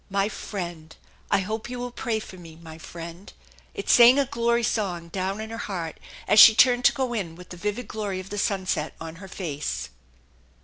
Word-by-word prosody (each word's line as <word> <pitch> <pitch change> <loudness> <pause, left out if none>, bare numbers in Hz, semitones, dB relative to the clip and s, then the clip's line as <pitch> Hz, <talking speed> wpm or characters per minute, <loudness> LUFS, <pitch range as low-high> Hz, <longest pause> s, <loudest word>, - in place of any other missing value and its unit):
"My 200 +1 +1
friend! 170 -7 -7 0.3
I - - +3
hope 220 +4 -4
you 250 - -5
will 245 0 -5
pray 235 -2 -2
for 200 - -10
me, 165 -3 -12
my 160 -1 -12
friend!" 170 +3 -9 0.4
It - - -6
sang 245 +2 +8
a 280 - +3
glory 235 -3 0
song 180 -7 -2
down 190 +3 -3
in 220 +1 -6
her 225 - -6
heart 170 -8 -5 0.3
as 210 - +5
she 220 - +10
turned 245 +1 +5
to - - +8
go 260 -2 -2
in 185 -8 -3
with 180 0 -13
the - - -8
vivid 210 +5 -3
glory 205 -3 -4
of 185 +1 -9
the 205 - -3
sunset 190 -6 -1
on 165 0 -8
her 190 +1 -10
face. 150 - -4
195 Hz, 205 wpm, -25 LUFS, 170-225 Hz, 0.4 s, she